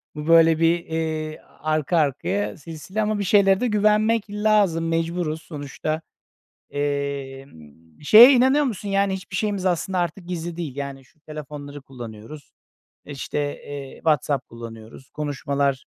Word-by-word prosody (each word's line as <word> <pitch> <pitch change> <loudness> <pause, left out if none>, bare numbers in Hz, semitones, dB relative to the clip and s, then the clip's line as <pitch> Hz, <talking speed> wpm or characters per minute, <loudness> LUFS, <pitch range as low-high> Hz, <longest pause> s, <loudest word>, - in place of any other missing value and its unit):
bu, 150 0 -6
böyle, 165 -1 +6
bir, 165 +1 +3
eee, 160 -1 -3 0.2
arka 155 +2 0
arkaya 125 -9 0
silsile 165 +7 -5
ama 215 0 0
bir 200 - 0
şeylere 195 0 +4
de 250 - 0
güvenmek 215 +1 +2
lazım, 205 -6 +2
mecburuz 165 -1 -1
sonuçta. 155 +1 -5 0.7
Emm, 135 - -5
şeye 225 - +9
inanıyor 265 +4 +4
musun? 210 -5 -4
Yani, 195 0 +1
hiçbir 190 0 -6
şeyimiz 205 -3 -1
aslında 185 +1 0
artık 175 +1 -3
gizli 170 -1 -4
değil, 155 -7 -5
yani, 140 -2 -6
şu 155 - -30
telefonları 145 -2 -8
kullanıyoruz, 120 +1 -11 0.5
işte, 145 0 -4 0.3
eee, 140 -2 -7
WhatsApp 145 -4 0
kullanıyoruz, 115 +3 -11
konuşmalar, 140 -2 -2
155 Hz, 130 wpm, -23 LUFS, 140-190 Hz, 0.7 s, şeye